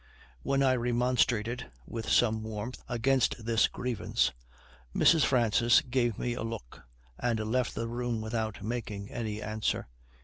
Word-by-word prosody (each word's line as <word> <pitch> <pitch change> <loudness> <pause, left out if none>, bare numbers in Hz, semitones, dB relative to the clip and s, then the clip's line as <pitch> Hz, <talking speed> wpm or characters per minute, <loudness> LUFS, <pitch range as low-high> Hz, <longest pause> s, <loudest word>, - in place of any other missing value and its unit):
When 135 - +1
I 130 -1 +4
remonstrated, 120 -1 +1 0.2
with 115 -1 -5
some 110 -2 +3
warmth, 110 +2 -5
against 120 -1 +1
this 115 -1 +3
grievance, 125 -2 -1 0.6
Mrs. 165 -3 +5
Francis 120 -1 +4
gave 120 -3 0
me 120 - -1
a 120 - -5
look, 115 - -6 0.4
and 120 -2 +1
left 120 +4 0
the 115 - -2
room 120 -1 -2
without 110 -2 -3
making 105 -3 -4
any 110 -3 -4
answer. 110 - -1
115 Hz, 135 wpm, -30 LUFS, 110-125 Hz, 0.6 s, Mrs